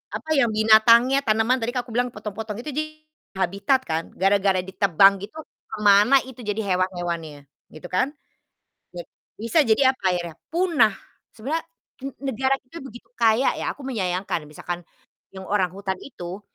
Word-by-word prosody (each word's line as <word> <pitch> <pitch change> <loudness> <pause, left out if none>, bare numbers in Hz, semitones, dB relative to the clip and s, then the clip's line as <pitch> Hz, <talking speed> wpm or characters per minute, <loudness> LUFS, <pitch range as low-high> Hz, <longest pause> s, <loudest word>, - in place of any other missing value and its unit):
apa, 315 - -7
ya, 275 -4 +4
binatangnya, 225 +4 +5
tanaman 225 +4 +2
tadi 230 +1 -2
kalau 250 - -1
aku 235 - -10
bilang 245 +1 +2
potong-potong 210 0 -6
itu 300 - -5
di 305 +3 -1 0.5
habitat, 195 +8 +1
kan, 160 -3 -2
gara-gara 195 0 +2
ditebang 195 0 +3
gitu, 205 +8 -10 0.4
ke - - -5
mana 205 +5 +6
itu 260 -1 -13
jadi 210 -2 -3
hewan-hewannya, 175 -5 -3 0.3
gitu, 155 +3 -9
kan? 260 +10 0 0.8
Jad - - -6 0.3
bisa 230 +9 -1
jadi 255 +4 +4
apa - - -23
akhirnya? 175 -2 -4 0.2
Punah. 325 - +3 0.4
Sebenarnya, 290 +9 -3 0.4
ne 275 - -3 0.2
negara 265 +4 +1
kita 330 +7 -12
begitu 240 -3 -12
kaya 230 +3 +3
ya, - - -3
aku 280 - -12
menyayangkan, 185 - -3
misalkan 175 +3 -6 0.5
yang 190 0 -9
orang 195 -3 +1
hutan 190 0 -4
itu 185 -7 -8
215 Hz, 155 wpm, -23 LUFS, 190-250 Hz, 0.8 s, mana